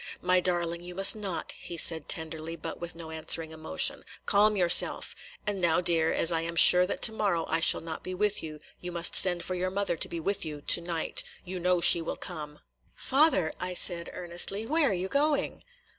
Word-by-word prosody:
"My 180 Hz, 0 st, 0 dB
darling, 175 Hz, -1 st, -4 dB
you 180 Hz, 0 st, -12 dB
must 195 Hz, +3 st, +4 dB
not," 200 Hz, -5 st, -6 dB
he 170 Hz, -, -9 dB
said 160 Hz, -1 st, +3 dB
tenderly, 160 Hz, -1 st, -4 dB
but 160 Hz, -, -10 dB
with 170 Hz, 0 st, -9 dB
no 165 Hz, -1 st, -12 dB
answering 160 Hz, 0 st, +2 dB
emotion. 155 Hz, -, 0 dB, 0.2 s
"Calm 210 Hz, +1 st, +1 dB
yourself. 175 Hz, -2 st, +2 dB, 0.3 s
And 205 Hz, -2 st, -5 dB
now, 170 Hz, -1 st, 0 dB
dear, 165 Hz, -2 st, +2 dB
as 165 Hz, -, +3 dB
I 165 Hz, -1 st, -3 dB
am 170 Hz, +1 st, -7 dB
sure 180 Hz, +2 st, +7 dB
that -, -, -6 dB
to 225 Hz, -, +9 dB
morrow 200 Hz, -7 st, -3 dB
I 165 Hz, -, -2 dB
shall 165 Hz, -, +1 dB
not 160 Hz, -1 st, -9 dB
be 185 Hz, -, -7 dB
with 210 Hz, +2 st, -2 dB
you, 155 Hz, -1 st, -11 dB, 0.2 s
you 180 Hz, -, -9 dB
must 170 Hz, 0 st, 0 dB
send 175 Hz, -2 st, +5 dB
for 185 Hz, -, -6 dB
your 180 Hz, +1 st, -4 dB
mother 195 Hz, -2 st, -4 dB
to -, -, -3 dB
be 170 Hz, -, -7 dB
with 200 Hz, +4 st, -4 dB
you 150 Hz, -2 st, -9 dB
to 170 Hz, -, +2 dB
night. 170 Hz, -1 st, -3 dB, 0.2 s
You 185 Hz, 0 st, -8 dB
know 180 Hz, 0 st, -2 dB
she 170 Hz, -, +6 dB
will 165 Hz, -, -7 dB
come." 150 Hz, -4 st, -11 dB, 0.3 s
"Father," 265 Hz, -, 0 dB, 0.2 s
said 170 Hz, -2 st, +3 dB
I -, -, -16 dB
earnestly, 180 Hz, +4 st, +1 dB
"where 305 Hz, +3 st, -1 dB
are -, -, -3 dB
you 185 Hz, +1 st, -5 dB
going?" 290 Hz, +6 st, -3 dB
175 Hz, 210 wpm, -25 LUFS, 165-190 Hz, 0.3 s, to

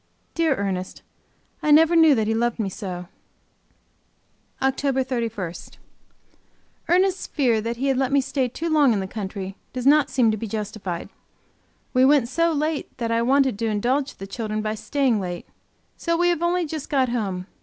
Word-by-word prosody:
Dear 325 Hz, -4 st, +2 dB
Ernest! 190 Hz, -3 st, -4 dB, 0.6 s
I 305 Hz, -, -1 dB
never 320 Hz, +3 st, +6 dB
knew 320 Hz, -3 st, +6 dB
that 220 Hz, -2 st, +1 dB
he 220 Hz, -, 0 dB
loved 235 Hz, +1 st, 0 dB
me 215 Hz, -4 st, -1 dB
so. 180 Hz, -3 st, -6 dB, 1.5 s
OCTOBER 265 Hz, 0 st, +1 dB
31. 230 Hz, -9 st, -3 dB, 1.4 s
Ernest's 370 Hz, +2 st, +2 dB
fear 240 Hz, -7 st, +1 dB
that 230 Hz, +2 st, -3 dB
he 265 Hz, -, -2 dB
had 270 Hz, -2 st, +2 dB
let 265 Hz, 0 st, 0 dB
me 280 Hz, -, +4 dB
stay 265 Hz, -1 st, -1 dB
too 315 Hz, +7 st, -5 dB
long 295 Hz, -6 st, +4 dB
in 205 Hz, -, 0 dB
the 190 Hz, -, -3 dB
country 195 Hz, -1 st, -6 dB, 0.2 s
does 255 Hz, -1 st, -4 dB
not 290 Hz, 0 st, +5 dB
seem 245 Hz, -4 st, +3 dB
to 215 Hz, -, -2 dB
be 225 Hz, -, -5 dB
justified. 210 Hz, -4 st, -5 dB, 0.8 s
We 255 Hz, 0 st, +4 dB
went 270 Hz, -3 st, +4 dB
so 335 Hz, +4 st, +2 dB
late 305 Hz, 0 st, -2 dB
that 230 Hz, -1 st, -2 dB
I 230 Hz, 0 st, +2 dB
wanted 260 Hz, -2 st, +2 dB
to 230 Hz, -, 0 dB
indulge 250 Hz, +7 st, 0 dB
the 195 Hz, -, -8 dB
children 215 Hz, +1 st, -4 dB
by 215 Hz, 0 st, -1 dB
staying 255 Hz, 0 st, 0 dB
late. 175 Hz, -2 st, -5 dB, 0.5 s
So 335 Hz, -1 st, 0 dB
we 350 Hz, +1 st, +3 dB
have 340 Hz, -2 st, 0 dB
only 345 Hz, 0 st, +1 dB
just 310 Hz, -1 st, -6 dB
got 265 Hz, -3 st, +2 dB
home. 195 Hz, -6 st, -2 dB
250 Hz, 175 wpm, -23 LUFS, 215-290 Hz, 1.5 s, never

